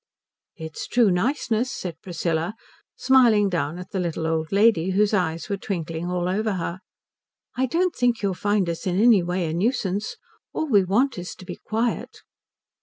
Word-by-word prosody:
"It's 160 0 -7
true 235 -5 +3
niceness," 235 +4 0
said 170 -9 -6
Priscilla, 170 +1 -2 0.4
smiling 240 -6 +4
down 165 -2 -2
at 180 - -9
the 190 - -2
little 170 -2 -2
old 160 -1 -1
lady 200 -4 +4
whose 210 +2 +2
eyes 170 -4 0
were 200 -2 -2
twinkling 170 -3 -4
all 180 -1 -1
over 210 +3 0
her. 175 0 -3 0.8
"I 260 +1 +1
don't 345 +7 0
think 240 -3 +1
you'll 195 -1 +1
find 205 0 0
us 170 +2 -3
in 180 +1 +1
any 225 -3 +6
way 175 +1 -1
a 155 - -3
nuisance. 205 +1 -1 0.4
All - - -1
we 205 -8 +4
want 220 +5 +1
is 180 - -7
to 185 - -13
be - - -7
quiet." 225 +2 -2
190 Hz, 175 wpm, -24 LUFS, 175-225 Hz, 0.8 s, any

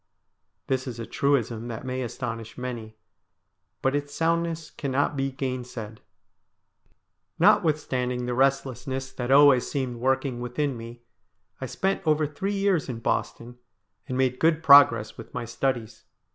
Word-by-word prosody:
This 130 0 -1
is 120 -2 -6
a 115 - -4
truism 120 -3 0
that 115 +1 -6
may 130 0 -3
astonish 115 -2 -5
many, 120 -4 -6 0.9
but 135 +1 +2
its 145 0 -3
soundness 165 0 -1
cannot 140 +1 -1
be 135 0 -1
gainsaid. 125 -5 -5 1.4
Notwithstanding 145 -10 +2
the 125 - -2
restlessness 135 0 0
that 125 -1 -5
always 140 -2 +6
seemed 130 -4 -3
work 130 +4 +1
ing 125 -3 -3
within 125 +3 -2
me 115 +1 -10 0.6
I - - -3
spent 195 0 -1
over 155 0 +3
three 190 +8 -3
years 195 -7 +1
in 120 - -4
Boston, 120 +1 -3 0.5
and 130 - -3
made 130 -1 +1
good 160 0 +2
progress 140 -8 +6
with 115 - -11
my 125 -1 -3
studies. 120 -1 -3
130 Hz, 140 wpm, -26 LUFS, 120-145 Hz, 1.4 s, always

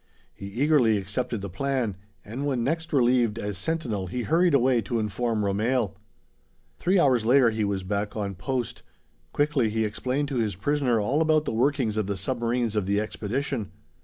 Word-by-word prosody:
He 100 - -8
eagerly 120 0 +3
accepted 105 +4 -3
the 100 - -5
plan; 130 -1 -1 0.3
and 130 +7 -4
when 130 -4 0
next 160 +5 -2
relieved 120 -5 +3
as 105 -3 -3
sentinel, 115 - -2
he 120 +7 -3
hurried 170 +1 +3
away 125 -2 +3
to 115 +3 -2
inform 110 +1 -1
Romehl. 110 +1 0 0.8
Three 185 +3 +2
hours 130 -9 +4
later 120 0 +5
he 110 -1 -1
was 100 -2 -1
back 100 +2 -2
on 100 -2 -2
post. 120 +6 -3 0.5
Quickly 145 -6 +1
he 110 +1 0
explained 130 +7 -2
to 135 - -2
his 110 -5 0
prisoner 130 +2 +1
all 130 +9 +1
about 155 -1 +3
the - - -2
workings 125 -2 +1
of 105 -3 0
the 100 -1 -2
submarines 120 +1 -1
of 105 -3 0
the 100 +1 +2
expedition. 110 0 -3
120 Hz, 175 wpm, -26 LUFS, 105-135 Hz, 0.8 s, later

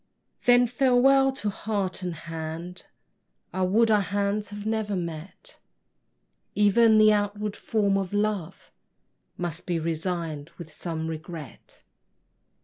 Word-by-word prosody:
Then 245 0 +6
farewell 270 +2 +4
to 210 -6 -3
heart 200 -3 -3
and 180 -2 -3
hand! 165 +2 -7 0.7
I 190 - -2
would 220 +5 +3
our 210 -1 +4
hands 200 +1 -1
had 205 0 -8
never 220 -2 -1
met: 170 - -7 1.0
Even 215 +2 +5
the 215 0 +7
outward 205 0 -1
form 200 -3 +1
of 190 -2 -4
love 205 -4 -2 0.7
Must 175 -1 -4
be 175 -2 0
resign'd 165 -2 -3
with 160 -3 -10
some 160 -1 -4
regret. 160 -3 -9
200 Hz, 120 wpm, -26 LUFS, 170-215 Hz, 1.0 s, the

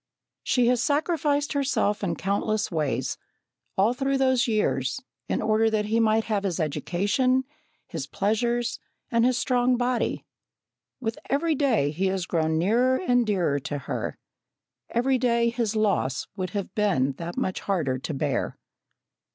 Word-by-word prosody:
She 250 -2 +2
has 245 0 +3
sacrificed 295 0 +1
herself 265 -7 0
in 170 -4 0
countless 205 +3 -1
ways, 155 -4 -1 0.6
all 205 +5 +4
through 270 +1 0
those 260 -1 +3
years, 215 -2 0 0.3
in - - 0
order 220 +1 +3
that 215 -1 0
he 220 +2 +1
might 220 0 +3
have 215 -3 -1
his 185 -3 -1
education, 205 - +1 0.4
his 150 -4 -5
pleasures, 235 +4 0 0.3
and 230 -1 +3
his 250 0 +3
strong 250 -1 +2
body. 245 0 -1 0.7
With 225 -3 -3
every 315 +4 +2
day 250 - +2
he 185 +5 0
has 190 -2 -1
grown 160 -3 0
nearer 235 +9 +3
and 245 -9 +2
dearer 175 -9 +1
to 145 +2 -4
her; 140 - -4 0.7
every 255 +2 +1
day 235 -1 +2
his 230 -2 -1
loss 200 -12 +1
would 185 -2 -3
have 200 +1 -4
been 185 -11 +2
that 170 +1 -5
much 185 - -1
harder 155 -10 -1
to 150 - -4
bear. 135 -3 -1
220 Hz, 150 wpm, -26 LUFS, 185-250 Hz, 0.7 s, all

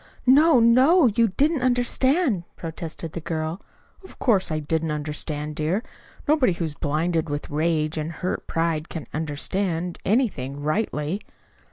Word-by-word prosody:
"No, 285 +2 +6
no! 260 +9 +5
You 230 0 +3
didn't 285 - +1
understand," 255 - +2
protested 165 -1 -6
the 170 - -6
girl. 160 +2 -3 0.4
"Of 380 - -14
course, 210 -7 +2
I 155 - 0
didn't 160 +1 -1
understand, 150 0 -3
dear. 165 +8 -1 0.4
Nobody 285 - +3
who 170 0 -3
is 155 - -4
blinded 160 +3 -1
with 145 0 -4
rage 155 0 0
and 155 +2 -3
hurt 180 +3 -4
pride 165 -1 -1
can 160 -4 -6
understand 165 +3 -2
anything, 185 - 0
rightly." 155 +2 -1
165 Hz, 140 wpm, -24 LUFS, 155-235 Hz, 0.4 s, No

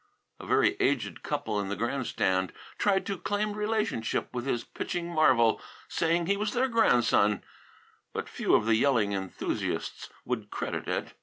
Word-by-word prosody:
A - - -9
very - - +3
aged - - 0
couple 105 -2 -2
in 100 -1 -3
the 100 - -1
grandstand 100 -5 0 0.3
tried 195 -2 +2
to 195 -3 -3
claim 205 +1 -1
relationship 210 - -1
with 125 +1 -3
his 120 -3 0
pitching 175 -1 -4
marvel, 130 -9 +4 0.3
saying 170 +1 +1
he 200 +3 +1
was 210 0 -1
their 255 +2 +2
grandson, 120 - +3 0.7
but - - -4
few - - +1
of 105 - +3
the 115 - +3
yelling 115 -3 +3
enthusiasts 95 -1 -3 0.2
would 110 -4 -3
credit - - -4
it. - - -2
130 Hz, 155 wpm, -29 LUFS, -, 0.7 s, marvel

